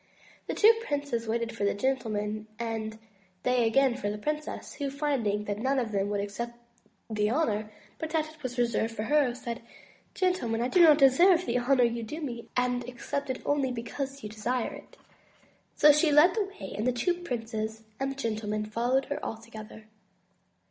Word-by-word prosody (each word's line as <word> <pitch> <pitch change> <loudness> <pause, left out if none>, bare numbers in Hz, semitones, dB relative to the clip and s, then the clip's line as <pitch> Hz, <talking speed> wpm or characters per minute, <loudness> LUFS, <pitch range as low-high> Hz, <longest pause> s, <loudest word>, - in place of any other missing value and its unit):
The - - -2
two 440 +2 +7
princes 285 - -2
waited 230 +1 -1
for 205 - -3
the 200 - +2
gentlemen, 215 -3 -1
and 225 -2 -3 0.5
they 250 -2 +3
again 265 +1 +3
for 250 -5 -2
the 210 - -3
princess, 300 +7 -4
who, 280 -2 -3
finding 270 -8 0
that 205 0 -3
none 265 +4 +1
of 235 -4 -1
them 200 -1 0
would 205 -1 0
accept 235 +4 -4 0.5
the 210 -1 0
honor, 215 -6 0 0.3
but 320 - -3
that 315 -1 +1
it 310 0 -16
was 255 -2 -5
reserved 230 -1 0
for 215 - -2
her, 270 0 +2
said: 235 -2 -5 0.5
"Gentle 365 -9 +1
men, 225 +1 0
I 250 - 0
do 360 - +4
not 310 -3 +8
deserve 340 +6 +6
the 245 +1 +1
honor 250 +1 +3
you 235 0 +1
do 265 +8 -6
me, 240 -7 -6
and 250 0 +1
accept 250 +3 -4
it 260 - -3
only 280 -3 +1
because 270 +3 -5
you 210 - -5
desire 230 +3 -2
it." - - -13 0.8
So 300 - +8
she 300 +1 +3
led 300 +5 +7
the 430 -3 0
way, 390 +1 -9
and 215 +4 -1
the - - +4
two 245 +9 +1
princes 225 -9 -4 0.2
and 270 0 0
the - - -6
gentlemen 215 -4 -2
followed 240 +5 +1
her 285 - -4
all 225 - -3
together. 220 -1 -11
245 Hz, 190 wpm, -29 LUFS, 220-285 Hz, 0.8 s, not